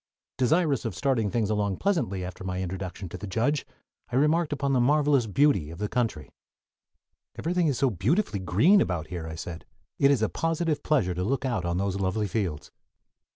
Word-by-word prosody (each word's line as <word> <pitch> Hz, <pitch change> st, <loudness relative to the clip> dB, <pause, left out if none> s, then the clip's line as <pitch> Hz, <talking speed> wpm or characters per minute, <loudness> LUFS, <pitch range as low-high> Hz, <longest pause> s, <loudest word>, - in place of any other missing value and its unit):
Desirous 145 Hz, +1 st, +2 dB
of -, -, -3 dB
starting 115 Hz, 0 st, +1 dB
things 110 Hz, -1 st, 0 dB
along 100 Hz, -2 st, 0 dB
pleasantly 100 Hz, -, 0 dB
after 90 Hz, +2 st, -8 dB
my 90 Hz, -1 st, -3 dB
introduction 95 Hz, +1 st, -5 dB
to -, -, -8 dB
the 105 Hz, -, -6 dB
judge, 120 Hz, +9 st, 0 dB, 0.4 s
I -, -, -2 dB
remarked 150 Hz, +4 st, +2 dB
upon 140 Hz, -1 st, 0 dB
the 130 Hz, -, +3 dB
marvelous 140 Hz, -1 st, +3 dB
beauty 105 Hz, -, +2 dB
of 85 Hz, -, -9 dB
the 105 Hz, +3 st, -2 dB
country. 115 Hz, -, -2 dB, 1.1 s
"Everything 175 Hz, 0 st, 0 dB
is 140 Hz, -3 st, 0 dB, 0.2 s
beautifully 135 Hz, -, +1 dB
green 110 Hz, -, +4 dB
about 85 Hz, -4 st, -2 dB
here," 85 Hz, -3 st, -5 dB
I 80 Hz, -, -6 dB
said. 85 Hz, +1 st, -7 dB, 0.4 s
"It 140 Hz, -, +5 dB
is 135 Hz, -6 st, +3 dB
a -, -, +3 dB
positive 165 Hz, -, -1 dB
pleasure 120 Hz, -13 st, +1 dB
to 90 Hz, +1 st, -2 dB
look 135 Hz, +6 st, -1 dB
out 115 Hz, -9 st, -1 dB
on 85 Hz, 0 st, -1 dB
those 100 Hz, 0 st, -1 dB
lovely 95 Hz, +3 st, 0 dB
fields." 90 Hz, -7 st, -3 dB
110 Hz, 185 wpm, -27 LUFS, 95-145 Hz, 1.1 s, It